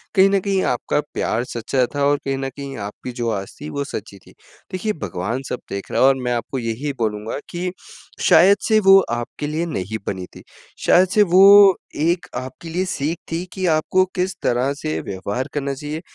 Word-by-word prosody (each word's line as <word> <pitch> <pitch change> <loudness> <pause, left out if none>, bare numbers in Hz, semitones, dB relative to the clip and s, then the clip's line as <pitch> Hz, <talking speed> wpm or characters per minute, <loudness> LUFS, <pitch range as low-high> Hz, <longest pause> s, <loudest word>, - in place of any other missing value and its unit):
कहीं 195 0 +6
न 200 0 +2
कहीं 195 0 0
आपका 125 +4 0
प्यार 115 - -1
सच्चा 125 +1 -1
था 145 - 0
और 145 +1 +3
कहीं 135 -1 -1
न 135 0 -3
कहीं 140 0 -8
आपकी 105 +4 -7
जो 120 -1 -3
आस 95 - -10
थी 150 - -6
वो 140 0 -3
सच्ची 100 -7 -7
थी। - - -19 0.4
देखिए, 210 +4 -2
भगवान 100 - -4
सब 125 - -3
देख 100 0 -6
रहा - - +1
है 130 - +7
और 135 - +5
मैं 125 0 0
आपको 120 +3 -3
यही 120 +5 -3
बोलूँगा 110 +2 -2
कि 180 +1 -3 0.6
शायद 190 +5 +7
से 220 -1 +4
वो 195 -1 +7
आपके 120 +5 -4
लिए 155 +3 -2
नहीं 110 - -4
बनी 95 -2 -3
थी। - - -12 0.4
शायद 185 +2 +5
से 210 +2 +4
वो 195 0 +8 0.2
एक 170 +3 0
आपके 130 +6 -7
लिए 180 +3 -1
सीख 160 -1 -2
थी 165 +2 -2
कि 190 -1 -3
आपको 185 +4 +2
किस 185 0 -1
तरह 125 +3 +1
से 155 +2 -3
व्यवहार 100 +6 -4
करना 140 -1 -2
चाहिए। 150 +3 -6
140 Hz, 200 wpm, -21 LUFS, 120-180 Hz, 0.6 s, वो